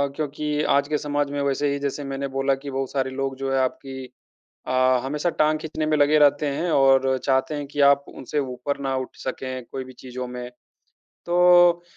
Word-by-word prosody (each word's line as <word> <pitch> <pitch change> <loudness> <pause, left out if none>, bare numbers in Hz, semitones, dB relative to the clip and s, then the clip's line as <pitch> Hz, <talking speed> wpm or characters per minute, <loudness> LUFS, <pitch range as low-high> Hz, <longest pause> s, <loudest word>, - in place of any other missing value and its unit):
क्योंकि 150 0 -2
आज 140 0 +2
के 150 -1 0
समाज 145 -1 -2
में 145 0 -2
वैसे 140 +1 0
ही, 140 - -2
जैसे 140 +1 -3
मैंने 135 0 -4
बोला 135 0 0
कि 140 +1 -8
बहुत 135 -1 -3
सारे 130 -1 -1
लोग 135 0 -3
जो 135 0 -3
हैं, 135 - +2
आपकी 130 0 -3 0.6
अ, - - -2 0.3
हमेशा 150 +5 -1
टाँग 155 0 +3
खींचने 155 0 -3
में 155 0 +1
लगे 145 +1 +4
रहते 145 0 +4
हैं 160 +5 -1
और 135 -1 +4
चाहते 130 +2 +1
हैं 145 -1 -4
कि 145 +1 -7
आप 140 0 +3
उनसे 145 +3 -4
ऊपर 130 +1 -3
ना 135 0 0
उठ 130 - -5
सकें, 130 -1 -5
कोई 130 - -4
भी 130 0 -12
चीज़ों 125 0 -7
में। 125 0 -7 0.8
तो 175 0 +5
140 Hz, 200 wpm, -23 LUFS, 130-150 Hz, 0.8 s, तो